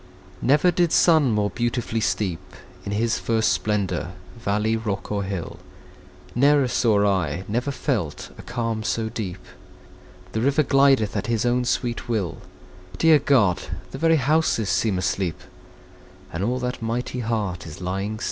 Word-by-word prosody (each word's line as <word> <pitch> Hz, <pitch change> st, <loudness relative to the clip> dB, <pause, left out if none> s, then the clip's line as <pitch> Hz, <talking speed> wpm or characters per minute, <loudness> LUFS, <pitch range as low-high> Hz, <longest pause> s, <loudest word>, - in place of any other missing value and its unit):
Never 150 Hz, +6 st, +4 dB
did 175 Hz, -1 st, +1 dB
sun 160 Hz, -6 st, +5 dB
more 105 Hz, -2 st, +1 dB
beautifully 120 Hz, -1 st, -1 dB
steep 95 Hz, -5 st, -1 dB, 0.5 s
In 100 Hz, -, -4 dB
his 115 Hz, +3 st, 0 dB
first 110 Hz, -5 st, +1 dB
splendour, 95 Hz, -1 st, -1 dB, 0.2 s
valley, 110 Hz, -1 st, 0 dB
rock, 105 Hz, -3 st, -4 dB
or 100 Hz, -1 st, 0 dB
hill; 95 Hz, -4 st, -5 dB, 0.7 s
Ne'er 140 Hz, +1 st, +4 dB
saw 110 Hz, -4 st, +2 dB
I, 90 Hz, -4 st, 0 dB
never 120 Hz, +6 st, -1 dB
felt, 125 Hz, -, -3 dB
a -, -, -10 dB
calm 115 Hz, -2 st, -3 dB
so 110 Hz, +1 st, -1 dB
deep! 95 Hz, -5 st, -6 dB, 0.9 s
The 110 Hz, -, -2 dB
river 140 Hz, +4 st, +3 dB
glideth 135 Hz, -6 st, +3 dB
at 100 Hz, 0 st, -2 dB
his 115 Hz, 0 st, 0 dB
own 125 Hz, +1 st, +1 dB
sweet 120 Hz, -1 st, -2 dB
will: 105 Hz, -7 st, -1 dB, 0.6 s
Dear 160 Hz, -2 st, +5 dB
God! 115 Hz, -11 st, +3 dB, 0.3 s
the 135 Hz, -, -7 dB
very 165 Hz, +1 st, +4 dB
houses 145 Hz, -7 st, +1 dB
seem 95 Hz, +2 st, +1 dB
asleep; 90 Hz, -2 st, -1 dB, 0.9 s
And 85 Hz, +3 st, -2 dB
all 125 Hz, +4 st, 0 dB
that 125 Hz, -1 st, -3 dB
mighty 120 Hz, +2 st, -3 dB
heart 105 Hz, -7 st, -2 dB
is 75 Hz, -, -9 dB
lying 95 Hz, +4 st, -3 dB
still! -, -, -12 dB
115 Hz, 150 wpm, -23 LUFS, 100-125 Hz, 0.9 s, sun